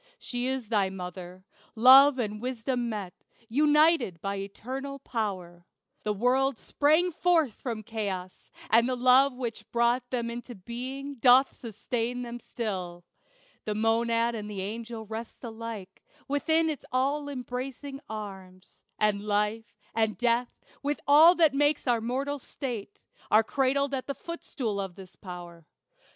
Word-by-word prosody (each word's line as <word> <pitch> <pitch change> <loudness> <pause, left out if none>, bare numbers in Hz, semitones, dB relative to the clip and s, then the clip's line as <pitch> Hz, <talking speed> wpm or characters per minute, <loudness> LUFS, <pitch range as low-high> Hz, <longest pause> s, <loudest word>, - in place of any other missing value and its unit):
She 245 - -3
is 260 -4 -3
thy 205 -4 +2
mother. 180 0 -8 0.3
Love 265 +4 +8
and 210 -3 -3
Wisdom 245 0 -2
met 200 -5 -5 0.3
United 295 - +3
by 200 +3 -3
Eternal 260 +8 -6
Power. 185 -9 -4 0.3
The 210 - -1
worlds 255 +6 +1
Sprang 315 +5 +2
forth 325 -7 +2
from 225 -3 -5
chaos; 200 -5 -5 0.2
and 230 +2 +5
the 255 - 0
love 255 +2 +5
which 240 -3 -6
brought 240 +1 +1
Them 235 -2 -2
into 240 +1 -7
being 260 +7 -6
doth 255 +3 +5
sustain 235 +2 -3
them 240 0 -6
still. 185 -8 -5 0.6
The 210 - -2
monad 230 +1 +2
and 210 -2 -5
the 200 -2 -4
angel 225 +2 -6
rest 225 +4 -7
alike 225 -4 -7 0.3
Within 320 +3 +2
its 305 -4 -3
all 280 +3 0
embracing 270 +1 -5
arms; 190 -3 -9 0.2
and 210 -1 +1
life, 210 +2 0 0.3
And 220 -1 +1
death, 240 0 0 0.2
with 290 +1 -1
all 315 +5 +8
that 320 -5 +4
makes 290 +2 +2
our 235 -2 +2
mortal 270 +5 -2
state, 235 -6 -6 0.3
Are 220 +1 +6
cradled 275 +3 +1
at 260 -1 -3
the 280 - -3
footstool 250 -11 -4
of 190 -3 -6
this 190 -2 -12
power. 175 -3 -10
235 Hz, 140 wpm, -28 LUFS, 210-270 Hz, 0.6 s, Love